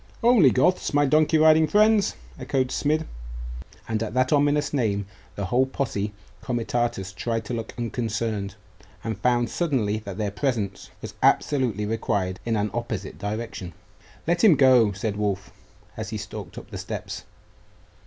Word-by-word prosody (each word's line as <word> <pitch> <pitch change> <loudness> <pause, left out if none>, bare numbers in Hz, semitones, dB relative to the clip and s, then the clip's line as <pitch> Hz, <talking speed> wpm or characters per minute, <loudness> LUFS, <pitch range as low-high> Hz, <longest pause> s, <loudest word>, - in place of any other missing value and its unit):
'Only 230 - +7
Goths, 145 +5 +2
my 145 0 +5
donkey 155 +3 +4
riding 155 0 +6
friends!' 210 +2 +4 0.2
echoed 130 -1 0
Smid, 155 +2 +1 0.8
and 110 -1 -1
at 115 +1 -3
that 130 +2 +2
ominous 145 0 +2
name 105 -7 0 0.3
the 100 - -3
whole 125 +7 +2
posse 105 -7 -2 0.3
comitatus 120 -5 -1
tried 115 +4 -2
to 120 - -4
look 115 -2 -5
unconcerned, 110 -4 -2 0.5
and 110 -2 -3
found 120 0 +2
suddenly 120 -11 0
that 100 -3 -8
their 105 -2 -1
presence 110 -4 -2
was - - -6
absolutely 120 -8 +2
required 100 -4 -1
in 115 -1 0
an 105 0 0
opposite 115 -4 -4
direction. 105 -4 -4 0.5
'Let 170 +1 +1
him 200 -8 +8
go,' 130 -6 +5
said 100 +1 -3
Wulf, 100 -2 -2 0.4
as 110 -1 -5
he 110 - -3
stalked 105 0 -8
up - - -10
the - - -5
steps. - - -5
115 Hz, 150 wpm, -25 LUFS, 105-140 Hz, 0.8 s, him